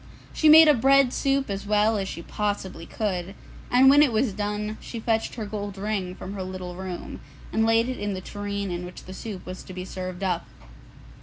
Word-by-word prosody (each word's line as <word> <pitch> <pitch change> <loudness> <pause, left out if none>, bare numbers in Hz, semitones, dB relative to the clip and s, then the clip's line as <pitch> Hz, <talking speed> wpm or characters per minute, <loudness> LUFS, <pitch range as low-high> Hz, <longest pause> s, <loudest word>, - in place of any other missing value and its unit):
She 310 - +4
made 320 +1 +10
a 300 - +7
bread 270 +1 +4
soup 275 -1 +1
as 200 0 -4
well 210 +1 +3
as 195 -2 -2
she 170 - -6
possibly 195 -5 -3
could, 195 -3 -3 0.3
and 255 +2 +6
when 285 +2 +8
it 295 -4 +5
was 220 -1 +1
done, 210 +1 -3
she 235 - -7
fetched 225 0 -1
her 220 -3 -4
gold 205 -1 -5
ring 195 -3 -2
from 190 - -7
her 195 - -5
little 185 -1 -6
room, 185 -1 -6 0.3
and 220 0 +2
laid 225 +1 +3
it 255 - -4
in 205 -1 -2
the - - -4
tureen 200 0 -4
in 175 0 -4
which 180 0 -9
the 185 - -9
soup 195 -2 -7
was 185 0 -7
to 185 - -10
be 180 0 -6
served 185 0 -6
up. 180 -3 -1
205 Hz, 215 wpm, -25 LUFS, 185-225 Hz, 0.3 s, made